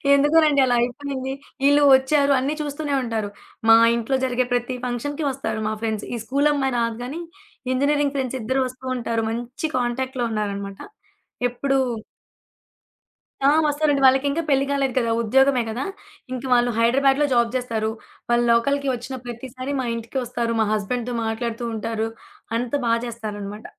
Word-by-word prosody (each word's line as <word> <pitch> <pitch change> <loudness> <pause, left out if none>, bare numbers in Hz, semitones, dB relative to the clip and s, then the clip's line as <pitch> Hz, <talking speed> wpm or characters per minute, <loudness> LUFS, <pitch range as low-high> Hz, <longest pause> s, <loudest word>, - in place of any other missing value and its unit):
ఎందుకోనండి, 295 0 +4
అలా 245 -1 +2
అయిపోయింది. 265 +2 -3 0.3
ఈళ్ళు 285 +1 +5
వచ్చారు 280 +2 +3
అన్నీ 270 +3 -1
చూస్తూనే 290 0 -3
ఉంటారు. 225 -3 -2 0.4
మా 225 - +10 0.2
ఇంట్లో 235 +3 -1
జరిగే 255 0 0
ప్రతి 245 +1 -1
ఫంక్షన్‌కి 285 +5 -3
వస్తారు 220 -5 -3
మా 215 - -1
ఫ్రెండ్స్. 220 -2 -2
ఈ - - -3
స్కూలు 280 +4 +2
అమ్మాయి 270 -2 0
రాదు 230 -1 -1
గానీ, 275 +7 -5 0.5
ఇంజనీరింగ్ 285 +1 +1
ఫ్రెండ్స్ 265 -1 -2
ఇద్దరు 260 +5 0
వస్తూ 255 +1 -11
ఉంటారు. 230 -1 -1
మంచి 240 +6 -4
కాంటాక్ట్‌లో 250 +1 -1
ఉన్నారనమాట. 200 -2 -3 0.7
ఎప్పుడూ 270 +2 0 1.7
ఆ! - - +7 0.2
వస్తారండి. 290 -1 +1
వాళ్ళకింకా 280 +4 +3
పెళ్లి 275 -1 +3
కాలేదు 275 -2 0
కదా, 230 -2 0
ఉద్యోగమే 260 +2 +3
కదా! 235 +5 -3 0.5
ఇంక 255 - -5
వాళ్ళు 245 0 +3
హైదరాబాద్‌లో 270 +5 +3
జాబ్ 235 -1 +2
చేస్తారు. 225 -3 -1 0.4
వాళ్ళు 240 0 +3
లోకల్‌కి 280 +4 +2
వచ్చిన 255 +2 -5
ప్రతిసారి 255 +3 -6
మా 260 - -1
ఇంటికొస్తారు. 235 0 -3
మా - - +3
హస్బెండ్‌తో 240 +4 -2
మాట్లాడుతూ 230 +1 -3
ఉంటారు. 220 0 -2 0.5
అంత 240 0 -3 0.2
బాగ 230 0 +3
చేస్తారనమాట. 210 -2 -6
250 Hz, 140 wpm, -23 LUFS, 230-275 Hz, 1.7 s, మా